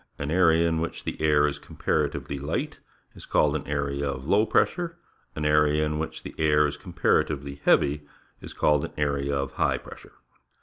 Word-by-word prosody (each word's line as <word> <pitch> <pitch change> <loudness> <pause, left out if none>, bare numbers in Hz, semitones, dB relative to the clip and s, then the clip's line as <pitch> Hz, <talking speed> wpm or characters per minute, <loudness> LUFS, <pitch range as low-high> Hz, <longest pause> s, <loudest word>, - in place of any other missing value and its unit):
An 70 +1 -4
area 85 -2 +4
in 80 -1 0
which 85 - -4
the - - -5
air 75 -1 +4
is 75 0 -2
comparatively 70 - -2
light 70 - -3 0.3
is - - -12
called 75 0 +2
an 75 - -4
area 70 0 -2
of 65 0 -5
lou} 105 +5 +3
pressure. 170 -1 +1 0.4
An 75 - -3
area 75 0 +3
in 75 0 -2
which 80 - -5
the - - -8
air 75 -1 +4
is 75 - -2
comparatively 70 -1 -1
heavy 75 +1 +3 0.3
is - - -9
called 75 -1 +2
an - - -6
area 70 -1 0
of 70 -1 -2
high - - +1
pressure. - - -13
75 Hz, 180 wpm, -26 LUFS, 70-80 Hz, 0.4 s, area